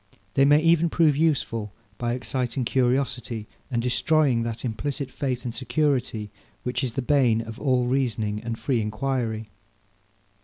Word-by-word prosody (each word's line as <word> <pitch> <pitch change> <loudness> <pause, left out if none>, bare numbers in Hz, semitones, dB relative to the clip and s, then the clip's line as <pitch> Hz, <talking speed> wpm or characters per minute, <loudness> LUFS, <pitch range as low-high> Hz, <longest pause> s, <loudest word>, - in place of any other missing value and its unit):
They 135 - +5
may 145 +1 +6
even 165 +1 +4
prove 160 -3 +3
useful, 135 -9 0 0.3
by 120 -1 0
exciting 125 0 -2
curiosity, 125 -3 0 0.2
and 120 -3 -1
destroying 130 0 +2
that 115 +1 -3
implicit 135 +4 -3
faith 125 -3 -3
and 120 - -3
security, 130 -4 0 0.3
which 125 +1 -2
is 125 -3 -1
the 135 - -2
bane 125 -5 +3
of 115 +1 -8
all 130 -3 +2
reasoning 115 -5 0
and 115 0 -4
free 125 -3 0
enquiry. 110 -1 -2
125 Hz, 145 wpm, -25 LUFS, 115-140 Hz, 0.3 s, may